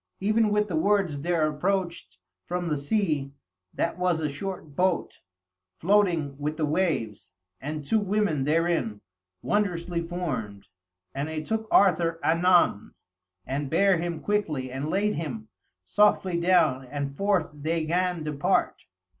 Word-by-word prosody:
Even 215 +2 +2
with 210 0 +1
the 180 - -3
words 180 -4 +1
there 165 -1 +1
approached 170 - -2 0.3
from 175 -1 -2
the 150 - 0
sea 145 -4 -1 0.4
that 170 - -2
was 180 -2 +1
a 155 - -1
short 155 0 -6
boat, 180 +1 0 0.6
floating 170 -7 +2
with 150 +2 -3
the 155 - +1
waves; 130 - -1 0.3
and 150 +1 -5
two 220 +8 +2
women 205 -8 0
therein, 160 -9 0 0.4
wondrously 175 -4 0
formed; 130 - -4 0.5
and 140 +2 -3
they 155 -1 -4
took 220 +4 -2
Arthur 170 -4 +3
anon, 170 - +3 0.5
and 140 +1 -3
bare 195 +3 +3
him 170 -1 -3
quickly, 155 -11 -1
and 135 +4 -4
laid 205 +4 +1
him 120 -9 -5 0.4
softly 190 - +3
down, 170 -7 +3
and 140 +1 -5
forth 195 -3 +1
they 155 +2 -2
'gan 175 0 0
depart. 150 -2 0
165 Hz, 135 wpm, -26 LUFS, 145-185 Hz, 0.6 s, Arthur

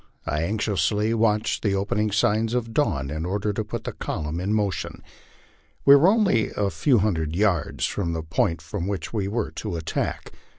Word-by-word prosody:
I 75 +1 -1
anxiously 105 +2 0
watched 110 -1 +1
the 100 -3 +1
opening 105 +2 0
signs 110 +3 +1
of 115 -2 -2
dawn 70 - 0
in 80 +1 -3
order 100 +4 -1
to 110 - -2
put 105 - -5
the - - -4
column 80 +1 -4
in 95 +3 -2
motion. 105 -3 -2 0.8
We 140 - +9
were 145 +5 +6
only 200 - +3
a 100 -1 +1
few 120 - +3
hundred 85 -7 0
yards 95 -5 +1
from 85 -5 -2
the 80 -1 -3
point 80 +1 0
from 85 +3 -4
which 100 -2 -4
we 100 -3 -1
were 110 +2 -2
to - - -5
attack. 80 -2 -3
100 Hz, 180 wpm, -24 LUFS, 85-110 Hz, 0.8 s, We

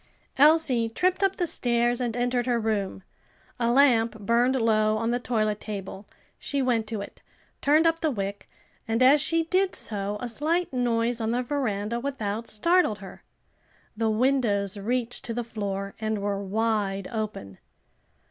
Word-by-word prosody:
Elsie 285 -6 +4
tripped 365 - 0
up 390 -1 +2
the 355 - 0
stairs 240 -5 +1
and 240 -1 -2
entered 245 0 0
her 240 -1 +2
room. 205 -4 -2 0.6
A 235 -1 +2
lamp 235 -4 +3
burned 235 +5 +2
low 215 -3 +2
on 230 +1 -1
the 245 - 0
toilet 215 -4 -1
table, 200 -1 -7 0.3
she 280 - -3
went 240 -4 +1
to 215 -2 -4
it, 200 - -10 0.4
turned 305 +3 +4
up 330 0 +2
the 320 - +1
wick, 200 -5 -4 0.4
and 225 +3 +1
as 275 +3 +6
she 330 +2 +2
did 370 +3 +1
so 205 -1 -3
a 245 - -4
slight 310 +8 -1
noise 240 -1 0
on 220 - -1
the 245 +2 0
veranda 235 -5 -2
without 230 -5 -3
startled 335 - +2
her. 195 -2 -11 0.7
The 225 0 0
windows 215 -4 +1
reached 235 +4 -2
to 230 - -4
the 240 - -2
floor 200 -3 -4
and 220 0 -1
were 200 0 -2
wide 200 -2 -1
open. 210 - -5
230 Hz, 160 wpm, -26 LUFS, 210-255 Hz, 0.7 s, as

